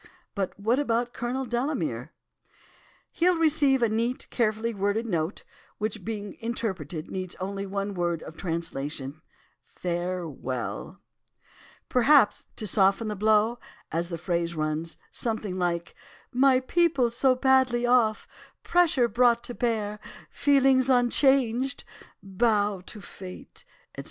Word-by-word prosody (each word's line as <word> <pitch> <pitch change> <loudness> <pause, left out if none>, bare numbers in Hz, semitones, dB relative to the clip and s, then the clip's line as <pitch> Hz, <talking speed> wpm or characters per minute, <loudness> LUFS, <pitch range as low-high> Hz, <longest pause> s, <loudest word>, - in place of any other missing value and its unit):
But 195 -1 -3
what 230 +6 +2
about 240 -3 0
Colonel 255 +3 -3
Delamere?' 245 +5 -2 1.0
"'He'll 355 +1 +2
receive 290 -5 +3
a - - +5
neat, 230 +3 -1
carefully 230 0 0
worded 205 +3 0
note, 170 -3 -2 0.3
which 215 -1 -3
being 205 -2 -5
interpreted, 185 - -4
needs 185 -1 -4
only 195 +1 -4
one 200 +1 -3
word 175 -3 -1
of 160 - -10
translation, 155 -4 -4 0.5
"farewell." 170 -8 -4 0.9
"'Perhaps 255 -1 +4
to 215 - -5
soften 195 +2 +2
the 210 - -3
blow, 215 +3 +2 0.3
as 170 +2 -1
the 170 - -4
phrase 170 0 -2
runs, 155 +1 -2
something 215 -5 -3
like 170 -1 -1 0.4
"my 260 0 +4
people 280 -4 +2
so 255 +2 +3
badly 255 -2 +3
off, 240 -3 +3 0.4
pressure 330 -8 +3
brought 235 +1 +3
to 245 - -6
bear—feelings 250 +4 +1
unchanged—bow 240 -5 +1
to 210 - -8
Fate, 185 0 -11 0.3
etc." - - -10
220 Hz, 115 wpm, -27 LUFS, 185-250 Hz, 1.0 s, a